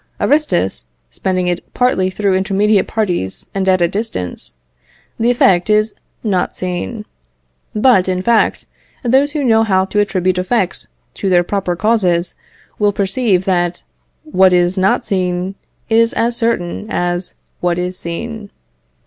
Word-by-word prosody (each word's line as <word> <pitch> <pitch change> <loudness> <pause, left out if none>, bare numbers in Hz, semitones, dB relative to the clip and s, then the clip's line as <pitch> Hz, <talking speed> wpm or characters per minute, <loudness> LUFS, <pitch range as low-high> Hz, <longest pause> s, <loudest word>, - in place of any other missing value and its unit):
Aristus, 190 - +1 0.3
spending 185 -1 -1
it 175 -1 -4
partly 220 -7 +2
through 195 +1 0
intermediate 200 +2 +2
parties, 180 - -2
and 190 -1 0
at 185 -2 +3
a - - +4
distance, 165 - -4 0.6
the 230 +1 +2
effect 195 -6 +3
is 215 0 +2 0.3
not 195 -5 0
seen. 185 +5 -4 0.7
But, 215 -4 +4
in 185 0 -1
fact, 235 0 +2 0.4
those 270 +4 +2
who 300 -2 -1
know 225 -3 +4
how 190 -3 +2
to 210 +2 -1
attribute 185 -3 +1
effects 185 0 -1 0.3
to 195 - -2
their 175 -1 +4
proper 185 -1 -2
causes, 180 -4 +1 0.5
will 205 -1 +3
perceive, 195 -1 0
that 175 -2 0 0.4
what 190 -12 +3
is 175 +1 +3
not 190 0 +1
seen 185 -1 -1 0.3
is 230 0 +3
as 235 +1 0
certain 225 -5 -1
as 175 0 -2 0.2
what 175 -1 0
is 180 +1 -2
seen. 210 +5 -5
190 Hz, 140 wpm, -16 LUFS, 180-220 Hz, 0.7 s, a